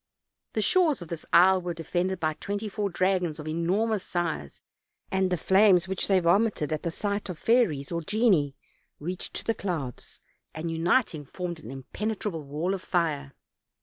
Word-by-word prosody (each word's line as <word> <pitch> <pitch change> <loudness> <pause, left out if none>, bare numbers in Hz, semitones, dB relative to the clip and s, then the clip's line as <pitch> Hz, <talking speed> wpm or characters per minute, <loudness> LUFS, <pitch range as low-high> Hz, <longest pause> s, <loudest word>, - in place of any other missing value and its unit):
The 215 - 0
shores 310 - +3
of 165 - -13
this 170 -2 -6
isle 185 +1 +6
were 175 -1 -4
defended 180 +3 -1
by 155 -2 0
twenty 205 +6 -4
four 205 0 -2
dragons 180 -3 +1
of 155 -1 -7
enormous 190 +7 0
size; 165 - -3 0.5
and 190 -1 +2
the 180 - 0
flames 190 -1 +5
which 190 -1 -1
they 195 -2 +4
vomited 175 -3 +2
at 155 - -2
the 170 - -2
sight 200 +3 -3
of 180 - -5
fairies 180 - +2
or 170 0 -1
genii 185 - +2 0.4
reached 175 +4 -5
to - - -4
the 225 - +1
clouds, 165 - -5 0.4
and 165 +1 -3
uniting, 165 - +1
formed 175 +3 -5
an 115 - -10
impenetrable 190 +7 -4
wall 150 +6 -2
of 190 - -3
fire. 150 -7 -1
180 Hz, 170 wpm, -27 LUFS, 160-200 Hz, 0.5 s, isle